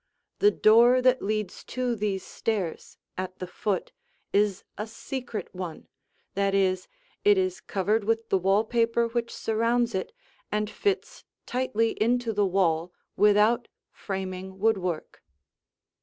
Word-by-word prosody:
The 410 - +6
door 240 - +6
that 255 0 +4
leads 215 -2 -2
to 250 -1 -1
these 200 -3 -2
stairs, 200 -7 -3 0.2
at 185 0 -4
the 185 - -5
foot, 185 +1 -2 0.4
is 200 -2 +2
a 210 +2 -4
"secret" 230 -2 -6
one; 180 -3 -6 0.5
that 200 0 +1
is, 185 -1 +1 0.4
it 415 -1 +6
is 370 -1 0
covered 205 +2 0
with 225 +1 0
the 195 - +3
wall 195 +3 +3
paper 230 0 +1
which 235 0 -2
surrounds 230 +2 0
it 190 - -2 0.4
and 210 0 -1
fits 400 -1 -2 0.2
tightly 235 -3 0
into 235 0 +2
the 205 -1 +2
wall 175 -3 +1 0.2
without 210 +3 +4 0.2
framing 190 -1 -5
woodwork. 190 -6 -1
210 Hz, 130 wpm, -27 LUFS, 190-235 Hz, 0.5 s, The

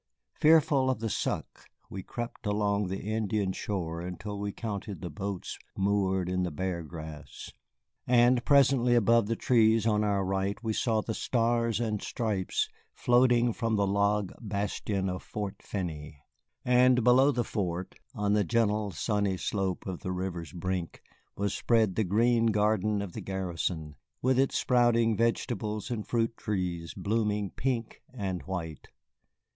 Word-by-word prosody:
Fearful 155 -4 +4
of 130 - 0
the 110 -1 -2
suck, - - -3 0.2
we 95 - -6
crept 120 +2 -6
along 105 -1 +1
the 95 +1 -4
Indian 105 -2 -1
shore 85 -5 -3
until 100 +4 -6
we 100 0 -2
counted 100 -4 -5
the 85 0 -6
boats 95 +4 -5 0.2
moored 95 -2 +1
in 90 0 0
the 90 - 0
Bear 85 +2 -3
Grass, 80 -2 -9 0.6
and 120 0 +4
presently 130 -4 +4
above 115 -1 +4
the 115 - 0
trees 115 -2 +3
on 105 -2 +2
our 100 -2 +1
right 95 +1 -1
we 110 -1 -1
saw 110 -1 +1
the 110 - -4
Stars 115 -1 +1
and 110 -3 -1
Stripes 105 -5 -1 0.2
floating 120 -1 +3
from 115 -1 -1
the 100 -1 +2
log 100 0 +1
bastion 100 -2 -2
of 90 0 -3
Fort 105 -2 -5
Finney. 75 -7 -5 0.4
And 125 0 +5
below 130 +4 +6
the 120 -3 0
fort, 90 -5 -3 0.2
on 105 0 +1
the 105 -1 +3
gentle 105 +1 +1
sunny 100 +1 -1
slope 95 -1 -2
to 95 -2 -4
the 90 - -5
river's 90 -4 -4
brink, 90 0 -4 0.3
was 100 0 -1
spread 110 -5 +2
the 110 - +1
green 115 +4 +3
garden 105 -1 +1
of 95 -4 -7
the - - -5
garrison, 85 -5 -3 0.2
with 130 0 +2
its 135 - +2
sprouting 120 -2 +3
vegetables 110 -1 -1
and 110 -3 -3
fruit 115 -1 0
trees 90 -5 -3
blooming 105 -2 -1
pink 120 -3 -3
and 95 -8 -3
white. 80 -5 -5
105 Hz, 150 wpm, -29 LUFS, 95-115 Hz, 0.6 s, below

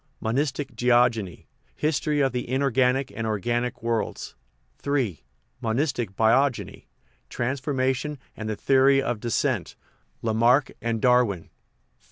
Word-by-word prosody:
Monistic 135 +2 -2
Geogeny 120 -5 +2 0.3
History 150 -1 0
of 135 -1 +2
the 125 -1 -4
Inorganic 130 0 +1
and 115 0 -3
Organic 120 +4 -2
Worlds 115 -1 -2 0.5
III. 130 - -1 0.4
Monistic 120 - -1
Biogeny 125 +4 +1 0.4
Transformism 130 +2 -1 0.2
and 110 0 -5
the 110 - -2
Theory 135 +3 +4
of 120 -5 -1
Descent: 120 0 -1 0.5
Lamarck 120 +4 +3
and 115 -1 -2
Darwin 125 -8 +3
IV. - - -27
125 Hz, 110 wpm, -25 LUFS, 115-135 Hz, 0.5 s, Theory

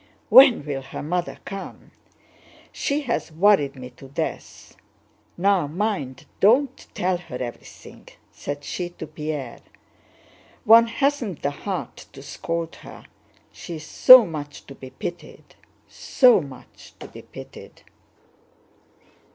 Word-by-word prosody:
"When 260 - +7
will 140 -2 -4
her 135 - -8
mother 175 +3 -3
come? 195 -1 -9 0.8
She 285 +2 -2
has 240 - -3
worried 160 -5 +3
me 125 -1 -10
to 135 +2 -15
death! 135 - -6 0.6
Now 190 -3 +2
mind, 155 -6 -3
don't 255 +6 +2
tell 180 0 0
her 175 -7 -11
everything!" 120 -2 -10 0.2
said 145 0 -7
she 175 +3 -5
to 175 - -9
Pierre. 150 -5 -6 1.1
"One 230 +1 +7
hasn't 240 - -2
the 140 - 0
heart - - -6
to - - -12
scold 165 0 -5
her, - - -13 0.5
she 170 - -9
is 155 -1 -9
so 255 +7 +8
much 145 -3 -8
to 140 - -11
be 130 -1 -12
pitied, 175 +5 -9 0.3
so 250 -3 +3
much 135 -3 -14
to - - -9
be - - -12
pitied." - - -13
170 Hz, 125 wpm, -23 LUFS, 145-215 Hz, 1.1 s, so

